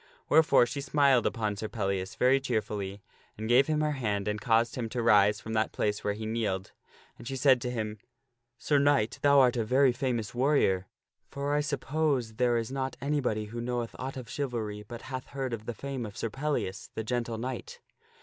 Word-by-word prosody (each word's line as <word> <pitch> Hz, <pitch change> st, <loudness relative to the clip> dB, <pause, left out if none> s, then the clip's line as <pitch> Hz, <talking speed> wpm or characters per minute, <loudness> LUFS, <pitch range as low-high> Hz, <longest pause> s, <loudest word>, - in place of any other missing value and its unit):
Wherefore 155 Hz, -5 st, +6 dB
she 140 Hz, +4 st, -4 dB
smiled 140 Hz, -2 st, +3 dB
upon 105 Hz, -3 st, -1 dB
Sir 110 Hz, -, -3 dB
Pellias 95 Hz, -4 st, -2 dB
very 130 Hz, +2 st, +4 dB
cheerfully 105 Hz, -6 st, -3 dB, 0.3 s
and 110 Hz, +1 st, -4 dB
gave 125 Hz, +4 st, +5 dB
him 155 Hz, -1 st, +1 dB
her 150 Hz, 0 st, +1 dB
hand 105 Hz, -7 st, -2 dB
and 105 Hz, 0 st, -2 dB
caused 115 Hz, +1 st, +2 dB
him 120 Hz, -3 st, -3 dB
to 125 Hz, -, -4 dB
arise 105 Hz, -2 st, +4 dB
from 110 Hz, -, -6 dB
that 110 Hz, 0 st, +1 dB
place 105 Hz, 0 st, -1 dB
where 105 Hz, 0 st, 0 dB
he 110 Hz, +1 st, -6 dB
kneeled. 110 Hz, -4 st, -2 dB, 0.5 s
And -, -, -9 dB
she 135 Hz, -, -3 dB
said 130 Hz, -1 st, +4 dB
to 125 Hz, -, -2 dB
him, 110 Hz, -3 st, -4 dB, 0.6 s
"Sir 145 Hz, +3 st, +2 dB
Knight, 140 Hz, -5 st, +2 dB
thou 140 Hz, -1 st, +6 dB
art 125 Hz, -2 st, +4 dB
a 115 Hz, -, +1 dB
very 130 Hz, +4 st, +4 dB
famous 120 Hz, -3 st, -2 dB
warrior; 120 Hz, -8 st, +2 dB, 0.4 s
for 140 Hz, +1 st, -2 dB
I 150 Hz, -, +2 dB
suppose 140 Hz, -5 st, -1 dB
there 120 Hz, -1 st, +3 dB
is 115 Hz, +1 st, -3 dB
not 135 Hz, -1 st, -3 dB
anybody 130 Hz, -7 st, -1 dB
who 115 Hz, +3 st, -6 dB
knoweth 120 Hz, -1 st, -3 dB
aught 135 Hz, +1 st, -5 dB
of 125 Hz, -2 st, -7 dB
chivalry 115 Hz, -6 st, -3 dB
but 115 Hz, +3 st, -9 dB
hath 130 Hz, -1 st, -6 dB
heard 135 Hz, -3 st, -4 dB
of 110 Hz, -1 st, -6 dB
the 120 Hz, -, -3 dB
fame 135 Hz, -1 st, -4 dB
of 105 Hz, -, -11 dB
Sir 115 Hz, -, -3 dB
Pellias, 135 Hz, -9 st, -3 dB
the 110 Hz, -, -2 dB
Gentle 120 Hz, 0 st, -2 dB
Knight. 130 Hz, -, -5 dB
120 Hz, 200 wpm, -29 LUFS, 110-135 Hz, 0.6 s, Wherefore